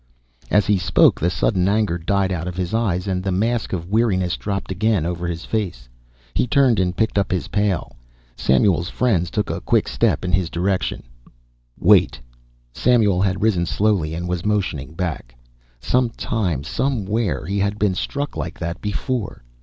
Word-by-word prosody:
As 105 - +3
he 105 -2 +2
spoke 90 - +4
the 85 - +1
sudden 90 0 +1
anger 100 -4 +1
died 95 +3 0
out 85 -1 -3
of 90 -1 -5
his 90 0 -2
eyes 100 -6 0
and 95 -2 -1
the 95 - -1
mask 110 +5 0
of 85 -3 -3
weariness 95 -5 +2
dropped 100 -2 -4
again 100 -2 +1
over 85 0 -3
his 85 0 -4
face. 90 - -3 0.5
He - - +1
turned 130 -4 +3
and 90 -1 0
picked 110 -2 +1
up 100 - -1
his 90 -2 -2
pail. 100 - -1 0.4
Samuel's 85 +6 +2
friends 95 -10 +1
took 105 - -2
a - - -4
quick - - +1
step - - +1
in 90 - -1
his 90 -2 +1
direction. 90 +3 -1 0.8
"Wait!" - - +4 0.5
Samuel 105 - +3
had 95 0 0
risen 90 -6 +2
slowly 95 -7 +1
and 85 +1 -4
was 90 -1 -2
motioning 85 -9 -2
back. 80 -9 -4 0.4
Some 125 - +1
time, 90 - -2
somewhere, 105 - -1
he 100 +4 -2
had 100 +1 0
been 105 -3 +1
struck 140 +10 -3
like - - -5
that 85 +1 -5
before. 105 - -3
95 Hz, 170 wpm, -21 LUFS, 85-105 Hz, 0.8 s, spoke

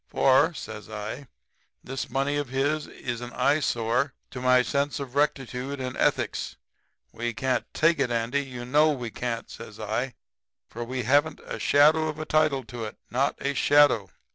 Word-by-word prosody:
For,' 135 +6 +3
says 110 -4 -8
I, 110 +6 -6 0.6
'this 135 +1 -5
money 135 +3 0
of 145 -3 -2
his 145 +4 0
is 120 -1 -5
an 120 0 -6
eyesore 130 -2 +1 0.2
to 125 - -6
my 125 0 +5
sense 140 +2 -1
of 135 -3 -6
rectitude 140 -1 -1
and 130 -1 -4
ethics. - - 0 0.6
We 120 0 -3
can't 130 -2 -1
take 165 -1 +3
it, 135 -3 +2
Andy; 120 +4 0
you 125 -3 -7
know 150 +5 +4
we 120 -5 -5
can't,' 115 -1 -4
says 110 -2 -10
I, 110 +4 -2 0.5
'for 120 - -6
we 125 +1 -3
haven't 145 +6 +2
a - - -5
shadow 155 +2 +4
of 155 -1 -4
a 155 - -4
title 150 -4 +2
to 120 0 -7
it 110 - -8
not 135 +3 +1
a 140 - +1
shadow. 140 -9 +4
130 Hz, 170 wpm, -26 LUFS, 120-145 Hz, 0.6 s, my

